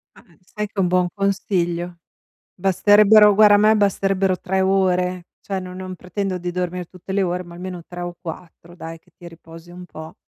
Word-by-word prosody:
Ma, - - -18 0.2
sai 210 +3 -6
che - - -38
è 195 - -3
un 180 - +2
buon 180 0 +2
consiglio? 180 -3 -2 0.6
Basterebbero 205 +3 +5
guarda 210 0 +6
a - - +5
me 215 +1 +4
basterebbero 195 -2 +1
3 190 +1 -1
ore, 185 -2 +1 0.2
cioè 195 -1 -4
no 185 0 -8
non 185 0 -7
pretendo 185 +1 -4
di 180 0 -5
dormir 180 -1 -4
tutte 185 +1 -9
le 195 0 +1
ore 180 0 -2
ma 170 0 -13
almeno 180 -1 -7
3 175 0 -8
o 175 0 -5
4 170 0 -10
dai, 165 -1 -9
che 180 - -30
ti 175 - -12
riposi 165 0 -14
un 180 0 -10
po'. 160 -1 -10
180 Hz, 200 wpm, -21 LUFS, 175-195 Hz, 0.6 s, guarda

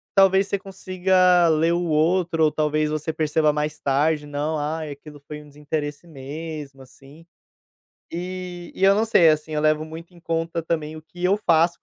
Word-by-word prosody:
talvez 195 0 +5
você 200 - -1
consiga 185 -2 +2
ler 160 +1 +2
o 175 +1 0
outro, 165 +1 +1
ou 155 - +2
talvez 155 0 0
você 155 +1 -3
perceba 155 -1 +1
mais 150 0 -3
tarde 150 +2 +1
"não, 145 +2 -2
ai, 155 +1 -3
aquilo 145 +1 -12
foi 150 0 -7
um 150 - -16
desinteresse 150 +2 -5
mesmo, 145 -1 -8
assim". 135 +5 -17 0.8
E 180 0 -6
e - - -4
eu 195 +1 +6
não 215 - +2
sei, 220 -7 +5
assim, 155 0 0
eu 150 - -1
levo 155 0 +2
muito 165 +3 -10
em 175 - -17
conta 165 0 -2
também 155 -1 -3
o 155 - -9
que 175 +3 -14
eu 185 +2 +3
faço 165 0 +3
160 Hz, 185 wpm, -23 LUFS, 150-175 Hz, 0.8 s, eu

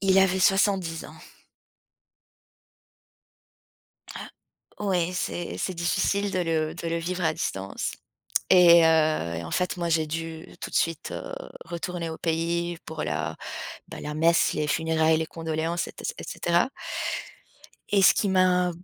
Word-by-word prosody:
Il 195 -1 +3
avait 190 0 +3
70 190 -3 +2
ans. - - -13 3.0
Ah - - -7 0.5
oui, 180 -4 0
c'est 175 -1 -3
c'est 185 - -2
difficile 200 +4 0
de 185 - 0
le 160 -2 0
de 170 -1 -5
le 165 0 0
vivre 180 +2 -3
à 160 -1 +2
distance 95 -7 -3 0.6
et 170 -2 +8
heu 155 - +2
et 85 - -4
en 80 - -7
fait, 180 0 0
moi, 170 -1 -1
j'ai 160 -1 +2
dû 165 +1 -5
tout - - -5
de - - -10
suite, 165 -1 0
heu, - - -6 0.3
retourner 170 0 -4
au 160 - -7
pays 170 +1 -1
pour 160 -1 -5
la - - -2 0.5
bah, - - -8
la 150 - -5
messe, 165 +2 +3
les 150 - 0
funérailles, 160 +1 +2
les 160 - -1
condoléances 165 +1 -2
et - - -10
ce - - -2
et - - -6
cetera. 175 +8 +1 1.2
Et 200 -1 +4
ce - - +8
qui 205 - +1
m'a 185 -1 +3
170 Hz, 155 wpm, -26 LUFS, 160-180 Hz, 3.0 s, et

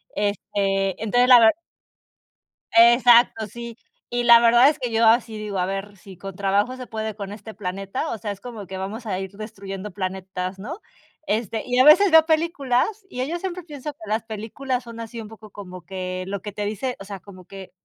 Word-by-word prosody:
Este, 195 -1 -1
entonces 245 +3 +3
la 250 -2 +9
verd 225 +4 +5 1.2
exacto, 235 -1 +6
sí. 235 +2 -9 0.3
Y 245 0 0
la 235 -1 +8
verdad 235 +3 +6
es 300 -1 -3
que 245 -2 -3
yo 225 +1 +3
así 225 -1 +3
digo: 205 -3 -4
"A 180 - +1
ver, 195 +1 -5
si 190 -1 -14
con 195 0 -8
trabajo 200 +5 0
se 255 -1 -9
puede 220 -2 -4
con 200 -2 -7
este 215 +1 -9
planeta, 195 +8 -4
o - - -3
sea, 210 -1 -5
es 200 0 -9
como 225 -5 -8
que 190 - -7
vamos 210 +5 -6
a 190 -4 -2
ir 190 0 -6
destruyendo 200 -1 -8
planetas", 185 0 -4
¿no? 310 - -7 0.5
Este, 220 0 -1
y 250 0 0
a 255 - +6
veces 365 +6 +7
veo 320 -1 +7
películas 320 - 0
mira 250 +1 -3
yo 335 +5 -3
siempre 365 0 -5
pienso 300 -3 -7
que - - -50
las 220 +1 -1
películas 230 +4 -4
son 230 -1 -10
así 230 0 -7
un 215 - -9
poco 215 -1 -14
como 185 -3 -10
que 185 -1 -5
lo 200 -1 -4
que 210 - -6
te 205 0 -3
dice 245 +5 -3
o - - -8
sea, 200 -1 -7
como 185 -2 -14
que 195 -1 -11
220 Hz, 210 wpm, -23 LUFS, 195-245 Hz, 1.2 s, la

